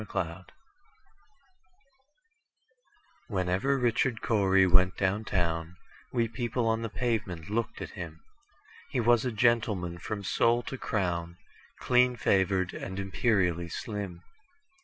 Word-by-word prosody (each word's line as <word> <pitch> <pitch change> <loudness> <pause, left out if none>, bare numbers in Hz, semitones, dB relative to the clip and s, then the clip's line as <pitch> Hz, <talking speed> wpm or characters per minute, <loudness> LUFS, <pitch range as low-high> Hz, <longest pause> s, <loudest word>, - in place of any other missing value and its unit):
Richard 110 - -10
Cory 90 -1 -3 2.9
WHENEVER 95 +7 +1
Richard 120 -1 +1
Cory 95 -4 +4
went 95 0 +4
down 100 +3 0
town, 85 -2 -1 0.3
We 115 -1 +1
people 120 0 -2
on 110 0 +1
the 115 - -3
pavement 105 -7 -2
looked 115 +1 -2
at - - -8
him:He 155 - -9
was 120 0 +4
a 125 - 0
gentleman 105 -6 +1
from 100 +3 -5
sole 115 +6 +2
to 135 - -6
crown, 85 -4 -2 0.4
Clean 125 0 +3
favored, 95 -4 +1
and 95 - -6
imperially 95 -4 +1
slim. 100 -2 -5
100 Hz, 115 wpm, -29 LUFS, 90-120 Hz, 2.9 s, Cory